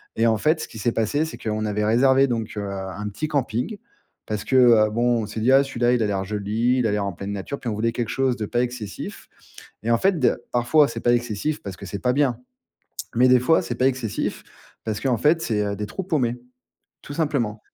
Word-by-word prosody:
Et 115 Hz, +1 st, +2 dB
en 110 Hz, -1 st, +3 dB
fait, 155 Hz, +8 st, +1 dB
ce -, -, -5 dB
qui -, -, -11 dB
s'est 115 Hz, +3 st, 0 dB
passé, 145 Hz, +8 st, 0 dB
c'est 160 Hz, -, -7 dB
qu'on 110 Hz, -1 st, -3 dB
avait 105 Hz, 0 st, -1 dB
réservé 130 Hz, +5 st, +4 dB
donc 115 Hz, -3 st, -3 dB
heu, 105 Hz, -1 st, -3 dB
un 95 Hz, +1 st, -5 dB
petit 155 Hz, +10 st, -4 dB
camping. 140 Hz, -, -2 dB, 0.5 s
Parce 105 Hz, -1 st, -3 dB
que 130 Hz, -, -1 dB
heu, 115 Hz, -4 st, +6 dB
bon, 120 Hz, +1 st, +1 dB
on -, -, -3 dB
s'est 110 Hz, +1 st, -6 dB
dit, 120 Hz, +4 st, +3 dB
ah, 135 Hz, +1 st, +6 dB
celui-là, 120 Hz, -3 st, +1 dB
il 120 Hz, -, +1 dB
a 110 Hz, -, +2 dB
l'air 95 Hz, -1 st, -2 dB
joli, 105 Hz, +5 st, 0 dB
il 120 Hz, -, +2 dB
a -, -, 0 dB
l'air 105 Hz, -1 st, 0 dB
en 100 Hz, -, -3 dB
pleine 100 Hz, +3 st, -6 dB
nature. 100 Hz, +8 st, -5 dB
Puis 120 Hz, -, -4 dB
on 110 Hz, -, -2 dB
voulait 115 Hz, +2 st, 0 dB
quelque 115 Hz, -1 st, -3 dB
chose 135 Hz, -2 st, +1 dB
de 105 Hz, -, -3 dB
pas 120 Hz, -, 0 dB
excessif 120 Hz, -5 st, -6 dB, 0.6 s
et 115 Hz, -, 0 dB
en 115 Hz, -, +4 dB
fait 190 Hz, +1 st, +2 dB
de 125 Hz, -2 st, +2 dB
parfois, 125 Hz, +5 st, +4 dB
c'est -, -, -5 dB
pas 120 Hz, -, +3 dB
excessif 120 Hz, +5 st, -1 dB
parce 95 Hz, -2 st, -7 dB
que 100 Hz, -, -9 dB
c'est 100 Hz, +1 st, -5 dB
pas 125 Hz, +2 st, +1 dB
bien. 135 Hz, -3 st, +1 dB, 0.8 s
Mais 125 Hz, +2 st, +5 dB
des 125 Hz, 0 st, +6 dB
fois, 145 Hz, +6 st, +3 dB
c'est 120 Hz, -, -4 dB
pas 130 Hz, -, +2 dB
excessif 125 Hz, -5 st, -2 dB, 0.4 s
parce 110 Hz, -2 st, -3 dB
qu'en 130 Hz, -3 st, +1 dB
fait, 155 Hz, +7 st, +3 dB
c'est 105 Hz, -3 st, 0 dB
heu, 100 Hz, 0 st, -2 dB
des 105 Hz, -, -4 dB
trous 150 Hz, -, -5 dB
paumés, 125 Hz, -9 st, 0 dB, 0.7 s
tout 145 Hz, -, -8 dB
simplement. 140 Hz, -9 st, -1 dB
120 Hz, 245 wpm, -23 LUFS, 105-130 Hz, 0.8 s, heu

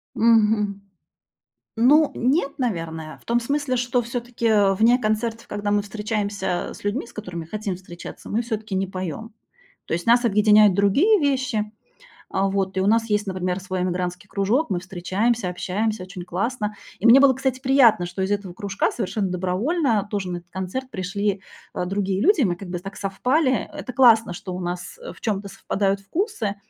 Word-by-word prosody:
Мгм. 215 Hz, -3 st, +3 dB, 1.0 s
Ну 290 Hz, +6 st, +5 dB
нет, 275 Hz, +4 st, +1 dB
наверное. 165 Hz, -9 st, -3 dB
В -, -, -25 dB
том 235 Hz, +1 st, +2 dB
смысле, 280 Hz, +1 st, -1 dB
что 245 Hz, 0 st, +1 dB
всё-таки 230 Hz, -4 st, +1 dB
вне 230 Hz, +5 st, +4 dB
концертов, 225 Hz, +1 st, -1 dB
когда 205 Hz, 0 st, -3 dB
мы 205 Hz, 0 st, +3 dB
встречаемся 205 Hz, -3 st, -3 dB
с -, -, -13 dB
людьми, 210 Hz, +5 st, -2 dB
с -, -, -16 dB
которыми 180 Hz, -6 st, -6 dB
хотим 205 Hz, +2 st, -4 dB
встречаться, 175 Hz, -1 st, -10 dB
мы 220 Hz, -, 0 dB
всё-таки 220 Hz, -4 st, -4 dB
не 190 Hz, 0 st, 0 dB
поём. 185 Hz, +4 st, -6 dB, 0.5 s
То -, -, -4 dB
есть 170 Hz, +1 st, -2 dB
нас 240 Hz, +1 st, +4 dB
объединяют 210 Hz, -1 st, +5 dB
другие 275 Hz, -, +4 dB
вещи. 260 Hz, -7 st, 0 dB, 0.6 s
А, 195 Hz, +1 st, 0 dB
вот 190 Hz, -1 st, -1 dB
и -, -, +2 dB
у 190 Hz, -, +1 dB
нас 225 Hz, +1 st, +2 dB
есть, 210 Hz, 0 st, 0 dB
например, 185 Hz, 0 st, -2 dB
свой 185 Hz, -1 st, -3 dB
эмигрантский 180 Hz, +1 st, -3 dB
кружок. 210 Hz, +12 st, +1 dB
Мы 180 Hz, -3 st, -1 dB
встречаемся, 190 Hz, +4 st, -1 dB
общаемся. 200 Hz, +4 st, -2 dB
Очень 185 Hz, -1 st, -8 dB
классно. 210 Hz, +4 st, -2 dB, 0.2 s
И 210 Hz, -, 0 dB
мне 240 Hz, +4 st, +8 dB
было, 275 Hz, -1 st, +6 dB
кстати, 260 Hz, 0 st, -2 dB
приятно, 260 Hz, -8 st, +5 dB
что 180 Hz, +2 st, -6 dB
из 190 Hz, -, 0 dB
этого 200 Hz, -3 st, -3 dB
кружка 200 Hz, +2 st, -1 dB
совершенно 200 Hz, -2 st, -2 dB
добровольно 205 Hz, -, 0 dB
тоже 200 Hz, -3 st, -2 dB
на 175 Hz, -, -3 dB
этот 175 Hz, 0 st, -19 dB
концерт 190 Hz, +9 st, -5 dB
пришли, 200 Hz, 0 st, -2 dB, 0.3 s
э, -, -, -2 dB
другие 195 Hz, 0 st, -1 dB
люди, 365 Hz, -, +4 dB
мы 180 Hz, -6 st, +1 dB
как 190 Hz, +1 st, -9 dB
бы 175 Hz, 0 st, -3 dB
так 195 Hz, +2 st, -9 dB
совпали. 255 Hz, +8 st, 0 dB
Это 250 Hz, -, -7 dB
классно, 230 Hz, -6 st, +5 dB
что 180 Hz, +1 st, -7 dB
у 180 Hz, -, -5 dB
нас 175 Hz, -, -5 dB, 0.2 s
в -, -, -18 dB
чём-то 205 Hz, -2 st, -2 dB
совпадают 195 Hz, +1 st, -1 dB
вкусы. 225 Hz, -, -2 dB
205 Hz, 175 wpm, -23 LUFS, 190-235 Hz, 1.0 s, мне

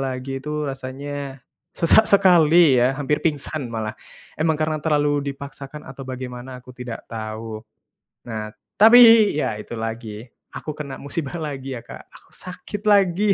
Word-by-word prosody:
lagi 135 Hz, 0 st, -4 dB
itu 150 Hz, 0 st, -3 dB
rasanya 135 Hz, 0 st, -6 dB, 0.3 s
sesak 170 Hz, +6 st, +5 dB
sekali 170 Hz, -7 st, +5 dB
ya, 125 Hz, -, +4 dB
hampir 145 Hz, +1 st, -1 dB
pingsan 145 Hz, -3 st, -2 dB
malah. 110 Hz, -2 st, -4 dB, 0.4 s
Emang 155 Hz, 0 st, 0 dB
karena 155 Hz, -1 st, -1 dB
terlalu 145 Hz, -2 st, +1 dB
dipaksakan 140 Hz, +1 st, -9 dB
atau 135 Hz, 0 st, -9 dB
bagaimana 130 Hz, 0 st, -7 dB
aku 125 Hz, 0 st, -14 dB
tidak 125 Hz, -2 st, -8 dB
tahu. 110 Hz, 0 st, -6 dB, 0.6 s
Nah, 110 Hz, -2 st, -5 dB, 0.3 s
tapi 225 Hz, -1 st, +8 dB
ya 130 Hz, -7 st, 0 dB
itu 115 Hz, +2 st, -8 dB
lagi 110 Hz, -1 st, -6 dB, 0.2 s
aku 155 Hz, -, -6 dB
kena 140 Hz, -3 st, -7 dB
musibah 145 Hz, +3 st, -4 dB
lagi 135 Hz, -5 st, -5 dB
ya, -, -, -9 dB
Kak, -, -, -10 dB
aku -, -, -19 dB
sakit 190 Hz, +3 st, -8 dB
lagi. 200 Hz, 0 st, +3 dB
140 Hz, 145 wpm, -22 LUFS, 125-155 Hz, 0.6 s, tapi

